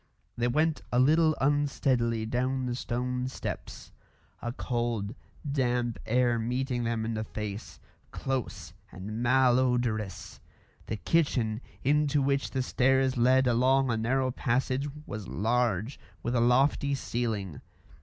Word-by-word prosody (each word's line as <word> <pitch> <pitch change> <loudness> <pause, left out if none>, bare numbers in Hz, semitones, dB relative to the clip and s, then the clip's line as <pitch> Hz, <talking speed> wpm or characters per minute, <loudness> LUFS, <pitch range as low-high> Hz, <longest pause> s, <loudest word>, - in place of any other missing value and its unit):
They 120 +1 0
went 155 +5 +1
a 125 - +1
little 155 +4 +4
unsteadily 135 -5 +1
down 130 +3 -1
the 125 - -2
stone 125 +1 -2
steps, 130 - -6 0.5
a 120 - -3
cold, 120 -4 -2 0.4
damp 125 -4 0
air 120 0 +2
meeting 125 +1 -1
them 115 -1 -1
in 115 - -2
the 110 0 -2
face, 105 -1 -6 0.3
close 135 -3 -4 0.2
and 105 +5 -6
mal 125 0 +4
odorous. 120 -6 -1 0.5
The 110 - -3
kitchen, 115 - +1 0.2
into 145 +1 +2
which 140 0 +1
the 130 -2 -1
stairs 130 +1 +2
led 130 +2 +4
along 130 +2 +3
a - - +1
narrow 130 +3 +1
passage, 130 +2 0 0.2
was 105 -3 -6
large, 115 +2 0 0.2
with 120 - -1
a 120 - +3
lofty 135 +3 +3
ceiling. 110 - -3
125 Hz, 130 wpm, -29 LUFS, 115-135 Hz, 0.5 s, little